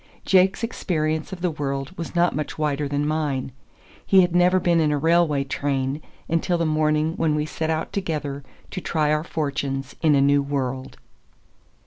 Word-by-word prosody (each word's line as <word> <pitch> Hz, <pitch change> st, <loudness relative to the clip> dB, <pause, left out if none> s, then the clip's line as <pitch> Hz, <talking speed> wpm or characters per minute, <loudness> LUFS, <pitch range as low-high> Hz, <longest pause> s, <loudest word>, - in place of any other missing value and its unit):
Jake's 190 Hz, +3 st, +3 dB
experience 160 Hz, -8 st, -1 dB
of 185 Hz, -2 st, -7 dB
the 180 Hz, -1 st, +1 dB
world 140 Hz, +1 st, -4 dB
was 170 Hz, -1 st, -6 dB
not 175 Hz, 0 st, +3 dB
much 150 Hz, -1 st, -4 dB
wider 150 Hz, -1 st, 0 dB
than 145 Hz, +1 st, -1 dB
mine. 150 Hz, -4 st, -1 dB, 0.5 s
He 190 Hz, -1 st, +5 dB
had 175 Hz, -1 st, +1 dB
never 180 Hz, +1 st, +4 dB
been 175 Hz, -2 st, +2 dB
in 155 Hz, -2 st, +2 dB
a 145 Hz, -, +1 dB
railway 160 Hz, -2 st, +3 dB
train 135 Hz, +1 st, -2 dB, 0.3 s
until 165 Hz, +2 st, +1 dB
the 170 Hz, -, 0 dB
morning 155 Hz, 0 st, +1 dB
when 155 Hz, -2 st, +1 dB
we 150 Hz, 0 st, 0 dB
set 160 Hz, +1 st, -3 dB
out 160 Hz, 0 st, -2 dB
together 150 Hz, -7 st, -3 dB, 0.3 s
to 185 Hz, -, -4 dB
try 155 Hz, -3 st, 0 dB
our 155 Hz, 0 st, 0 dB
fortunes 140 Hz, -4 st, -3 dB
in 155 Hz, -3 st, +4 dB
a -, -, +4 dB
new 140 Hz, +1 st, +4 dB
world. 135 Hz, -2 st, -3 dB
155 Hz, 175 wpm, -23 LUFS, 140-170 Hz, 0.5 s, He